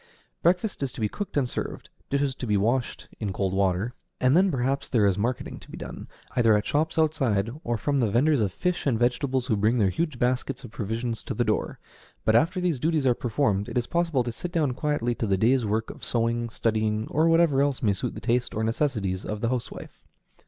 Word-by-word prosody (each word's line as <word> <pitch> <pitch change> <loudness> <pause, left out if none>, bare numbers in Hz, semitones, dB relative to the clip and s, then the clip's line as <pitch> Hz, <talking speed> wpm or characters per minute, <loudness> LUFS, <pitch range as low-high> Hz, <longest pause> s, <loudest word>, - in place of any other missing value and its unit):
Breakfast 180 +3 +1
is 135 -2 -1
to - - -9
be 110 - +1
cooked 200 - -5
and 135 -3 +2
served, - - -5 0.2
dishes 140 -1 +1
to 125 - -6
be 105 -1 +2
washed 120 +5 0
(in 105 -3 -2
cold 95 0 -1
water); 95 +4 +1 0.3
and 130 +2 +4
then 190 +2 +5
perhaps 135 -2 -1
there 110 -5 +3
is 100 -2 +3
marketing 120 +6 -2
to - - -16
be - - -8
done, - - -8 0.3
either 115 -3 +5
at 105 - -2
shops 155 +3 0
outside 130 -10 +1
or 120 -1 -1
from 140 +5 0
the 115 -4 +2
vendors 135 +5 +3
of 100 -3 +1
fish 180 - -1
and 125 -5 +2
vegetables 125 +2 +1
who 115 - +1
bring 110 +4 +2
their 100 -5 +3
huge 155 - -2
baskets 125 +2 -1
of 120 - -9
provisions 115 +2 -3
to - - -5
the 120 - +2
door; 110 - -1 0.5
but 110 - +4
after 165 - +3
these 175 -7 0
duties 155 0 +1
are 125 - +5
performed, 110 -4 0
it - - -3
is 120 - +1
possible 165 -6 +1
to 120 - -3
sit 175 +9 -6
down 155 -6 +1
quietly 125 -3 -1
to 115 - -3
the 95 -1 +2
day's 120 +3 +3
work 110 +2 -1
of - - -14
sewing, 115 0 0
studying, 110 -1 0
or 160 +2 +3
whatever 165 -4 +4
else 140 -2 0
may 105 -3 +3
suit 95 - -4
the - - -5
taste 120 +1 0
or 110 - -1
necessities 110 -6 -1
of 105 0 -4
the 115 - +1
housewife. 125 -2 -5
120 Hz, 225 wpm, -26 LUFS, 110-145 Hz, 0.5 s, then